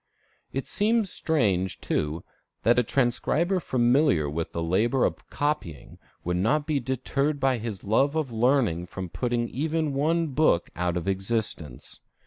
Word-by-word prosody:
It 135 - -3
seems 215 -1 +1
strange, 100 - 0
too, 75 +2 -2 0.4
that 120 +2 +4
a - - +5
transcriber 140 - +1
familiar 120 - +2
with 80 +3 -3
the 85 - -3
labor 110 +10 +2
of - - -4
copying 145 - -3 0.2
would 90 +1 -1
not 145 +11 +1
be 150 -2 0
deterred 135 +3 -1
by 130 -2 +2
his 110 -4 -5
love 135 +8 +2
of 155 -6 -1
learning 115 -7 +2
from 95 -1 -6
putting 120 +5 -1
even 155 +2 -1
one 160 +4 +1
book 140 - +2
out 90 0 -1
of 90 +2 -4
existence. 95 - -3
120 Hz, 145 wpm, -26 LUFS, 95-145 Hz, 0.4 s, a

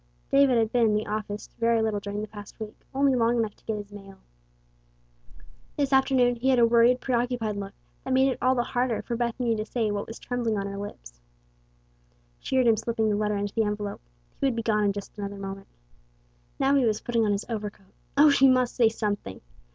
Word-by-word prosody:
David 275 -3 +5
had 225 -1 +1
been 240 -2 +3
in 210 - +2
the 210 - -1
office 210 0 -4
very 230 0 +3
little 220 -2 0
during 205 +1 -5
the - - -5
past 205 0 -12
week, 215 -1 -7 0.2
only 275 0 +2
long 240 -1 +2
enough 220 -3 -1
to - - -29
get 220 -1 -2
his 205 0 -8
mail. 195 -1 -12 1.6
This 280 -2 0
afternoon 260 -2 +3
he 255 +3 0
had 260 - +4
a 235 - +6
worried, 235 +2 +4
preoccupied 240 -4 -1
look 200 0 -6 0.3
that 265 - -4
made 265 +1 +4
it - - -5
all 255 +1 +3
the 240 - +1
harder 245 -2 -1
for 235 - -3
Bethany 235 0 -1
to 215 - -2
say 220 -1 -1
what 205 0 -3
was 225 - -8
trembling 240 -3 -2
on 200 - -2
her 200 0 -5
lips. - - -9 1.2
She - - -4
heard 260 -1 +4
him 225 -2 +4
slipping 225 0 -1
the 210 - +1
letter 210 0 0
into 200 0 -3
the 225 - +1
envelope. 210 -1 -3 0.4
He 275 - +2
would 255 - 0
be 230 - -2
gone 210 -2 +1
in 200 - +3
just 200 0 -8
another 200 0 -5
moment. 195 0 -7 0.9
Now 270 +1 +2
he 275 -2 +4
was 220 -3 +1
putting 235 -2 0
on 210 - +2
his 200 +1 -1
overcoat. 210 -4 -6 0.2
O, 295 +1 +7
she 270 -1 +5
must 255 -2 +2
say 235 -3 +4
something! 205 - -3
225 Hz, 220 wpm, -26 LUFS, 205-245 Hz, 1.6 s, O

